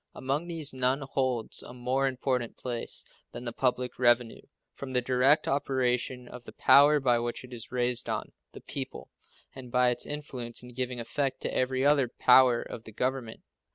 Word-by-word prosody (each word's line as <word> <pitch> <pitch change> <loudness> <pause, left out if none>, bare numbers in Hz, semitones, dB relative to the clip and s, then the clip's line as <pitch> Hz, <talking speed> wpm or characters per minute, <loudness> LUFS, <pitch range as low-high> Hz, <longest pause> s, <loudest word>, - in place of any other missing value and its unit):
Among 140 +6 -2
these 160 -5 -2
none 130 +2 +1
holds 130 -4 -1
a 120 - -11
more 130 +2 0
important 125 -2 -2
place 120 -2 -2 0.3
than 125 - -7
the 120 - -3
public 125 -1 -1
revenue, 120 -2 +2 0.3
from 135 -1 -8
the 125 - +2
direct 130 +4 +3
operation 125 -2 -1
of 125 0 -10
the - - -10
power 145 +2 +6
by 125 -3 +2
which 120 +1 -4
it 125 0 -12
is 115 -2 -9
raised 125 -1 0
on - - -3 0.2
the - - -11
people, - - -6 0.4
and 130 -2 -10
by 125 0 +4
its 120 - -4
influence 130 -6 -5
in 125 - -11
giving 125 0 -3
effect 135 +3 -2
to - - -3
every 130 +1 0
other 145 -3 +4
power 125 0 +5
of 115 - -9
the 110 - -10
Government. 125 0 -3
125 Hz, 180 wpm, -29 LUFS, 120-135 Hz, 0.4 s, power